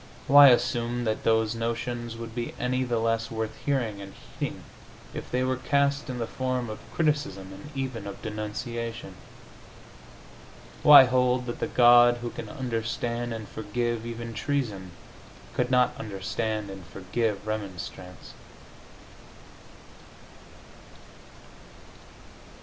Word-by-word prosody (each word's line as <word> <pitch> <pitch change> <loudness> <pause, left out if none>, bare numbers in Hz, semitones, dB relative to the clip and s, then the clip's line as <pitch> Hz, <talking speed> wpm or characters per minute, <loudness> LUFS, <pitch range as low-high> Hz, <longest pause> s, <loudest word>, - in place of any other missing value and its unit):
Why 145 0 +9
assume 120 -1 +2
that 110 -2 -1
those 110 -1 +2
notions 115 0 -3
would 115 -1 -7
be 120 0 -4
any 125 +1 0
the 120 -2 -1
less 115 0 0
worth 110 -1 -4
hearing 120 -8 -1
and 100 0 -10 0.2
heeding - - -3 0.5
if - - -7
they 125 +1 0
were 130 0 0
cast 140 +2 +1
in 125 - -3
the 115 - -2
form 130 -2 -2
of 110 - -7
criticism, 145 - -1
and 145 +10 -11
even 130 -6 -4
of 100 - -7
denunciation? 110 0 -5 1.7
Why 145 -2 +10
hold 125 0 +2
that 120 - -5
the - - -1
God 120 0 +6
who 120 0 -5
can - - -7
understand 120 -3 -3
and 110 -2 -5
forgive 115 +2 -3
even 115 0 -6
treason 110 -7 -2 0.6
could - - 0
not 125 -1 +3
understand 105 +1 -3
and 95 -1 -9
forgive 100 +3 -2
remonstrance? 95 -4 -6
115 Hz, 120 wpm, -27 LUFS, 110-125 Hz, 1.7 s, Why